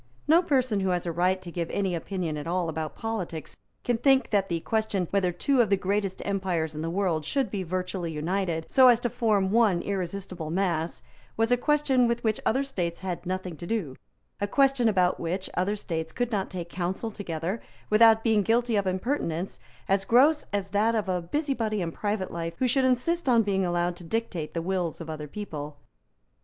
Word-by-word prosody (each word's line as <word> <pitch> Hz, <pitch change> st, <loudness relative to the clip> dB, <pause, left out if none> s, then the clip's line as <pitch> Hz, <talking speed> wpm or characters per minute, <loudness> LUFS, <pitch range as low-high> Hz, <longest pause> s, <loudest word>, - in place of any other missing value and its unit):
No 325 Hz, +3 st, +6 dB
person 255 Hz, -, +1 dB
who 190 Hz, -1 st, 0 dB
has 180 Hz, -1 st, 0 dB
a 170 Hz, -, -1 dB
right 180 Hz, +3 st, +1 dB
to 175 Hz, -, -7 dB
give 170 Hz, -1 st, -3 dB
any 195 Hz, -2 st, -1 dB
opinion 170 Hz, -1 st, -3 dB
at 150 Hz, +1 st, -5 dB
all 175 Hz, -1 st, 0 dB
about 155 Hz, -2 st, -4 dB
politics 185 Hz, -8 st, -4 dB, 0.3 s
can 240 Hz, -2 st, 0 dB
think 270 Hz, +1 st, +3 dB
that 200 Hz, -2 st, +2 dB
the 170 Hz, -1 st, -1 dB
question, 215 Hz, -3 st, 0 dB
whether 195 Hz, -3 st, +2 dB
two 265 Hz, +8 st, +2 dB
of 220 Hz, -, +1 dB
the 200 Hz, -, +3 dB
greatest 195 Hz, 0 st, -1 dB
empires 185 Hz, -5 st, -1 dB
in 155 Hz, -, -5 dB
the 165 Hz, -, -2 dB
world 175 Hz, -3 st, 0 dB
should 270 Hz, -, -1 dB
be 200 Hz, -, -2 dB
virtually 180 Hz, -1 st, -3 dB
united 165 Hz, +1 st, -1 dB
so 260 Hz, -1 st, +6 dB
as 240 Hz, -2 st, +6 dB
to 240 Hz, -, -1 dB
form 205 Hz, -4 st, +1 dB
one 210 Hz, -6 st, +3 dB
irresistible 185 Hz, -3 st, -4 dB
mass, 170 Hz, -6 st, -1 dB, 0.3 s
was 225 Hz, +1 st, +2 dB
a -, -, +7 dB
question 270 Hz, -2 st, +2 dB
with 235 Hz, 0 st, -1 dB
which 220 Hz, -2 st, +1 dB
other 265 Hz, +5 st, +2 dB
states 175 Hz, -11 st, -3 dB
had 185 Hz, -2 st, -4 dB
nothing 185 Hz, -2 st, -3 dB
to 170 Hz, -, -8 dB
do, 180 Hz, -, -2 dB, 0.4 s
a 205 Hz, -, 0 dB
question 270 Hz, -1 st, +3 dB
about 185 Hz, -3 st, +2 dB
which 180 Hz, +3 st, -3 dB
other 190 Hz, +4 st, 0 dB
states 160 Hz, -5 st, -4 dB
could 245 Hz, -1 st, -2 dB
not 200 Hz, -3 st, -1 dB
take 175 Hz, -3 st, -5 dB
counsel 185 Hz, +6 st, -3 dB
together 185 Hz, +1 st, -4 dB, 0.3 s
without 225 Hz, +1 st, +6 dB
being 220 Hz, -3 st, +3 dB
guilty 230 Hz, +2 st, +2 dB
of 200 Hz, -2 st, +1 dB
impertinence 185 Hz, -, -2 dB, 0.3 s
as 195 Hz, 0 st, +2 dB
gross 270 Hz, +9 st, +4 dB
as 200 Hz, -1 st, -2 dB
that 215 Hz, +4 st, +2 dB
of 210 Hz, -3 st, -1 dB
a 180 Hz, -1 st, 0 dB
busybody 230 Hz, -, -1 dB
in 170 Hz, -3 st, -2 dB
private 205 Hz, 0 st, -2 dB
life 165 Hz, 0 st, -4 dB
who 255 Hz, -, +1 dB
should 260 Hz, +2 st, +2 dB
insist 265 Hz, +5 st, +1 dB
on 230 Hz, -2 st, +5 dB
being 195 Hz, -2 st, +1 dB
allowed 175 Hz, 0 st, 0 dB
to 175 Hz, -, -11 dB
dictate 175 Hz, -5 st, -3 dB
the 165 Hz, -, -1 dB
wills 180 Hz, -3 st, -1 dB
of 160 Hz, -1 st, -6 dB
other 150 Hz, -1 st, -6 dB
people. 150 Hz, -5 st, -6 dB
195 Hz, 200 wpm, -27 LUFS, 170-225 Hz, 0.4 s, a